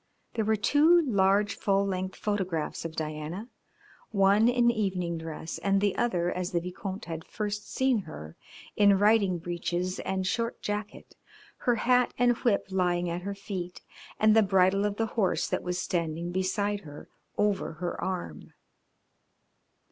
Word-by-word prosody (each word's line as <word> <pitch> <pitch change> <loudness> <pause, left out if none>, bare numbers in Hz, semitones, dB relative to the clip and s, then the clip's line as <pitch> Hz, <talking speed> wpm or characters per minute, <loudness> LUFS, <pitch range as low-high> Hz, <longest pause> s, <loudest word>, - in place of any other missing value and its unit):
There 220 -2 -1
were 220 +1 +3
two 295 - +5
large 200 -3 +3
full 195 0 +1
length 190 -1 -3
photographs 185 -7 -2
of 160 -1 -5
Diana, 155 +8 -5 0.6
one 200 +2 +4
in 240 -1 +4
evening 185 -6 -2
dress 160 0 -6
and 195 0 +2
the 200 -1 +1
other 180 -7 0
as 180 0 -3
the 170 - +2
Vicomte 185 +3 -6
had 165 -1 -5
first 210 -1 -5
seen 260 -3 +2
her, 80 - -9 0.4
in 205 -1 +5
riding 205 -3 +3
breeches 175 +2 -3
and 190 -1 -2
short 230 +5 -1
jacket, 210 0 -5 0.4
her 245 - +1
hat 250 +2 +2
and 245 -1 +4
whip 225 -5 +1
lying 175 -2 +1
at 175 +1 -3
her 200 +2 -4
feet, 185 -3 -6 0.4
and 215 0 +5
the 220 - +7
bridle 195 0 +3
of 205 -1 -1
the 225 - 0
horse 215 -4 0
that - - -1
was 180 0 -3
standing 170 -2 -2
beside 200 +3 0
her 150 -6 -11 0.3
over 205 -4 0
her 175 +2 -4
arm. 175 - -5
195 Hz, 155 wpm, -28 LUFS, 175-210 Hz, 0.6 s, the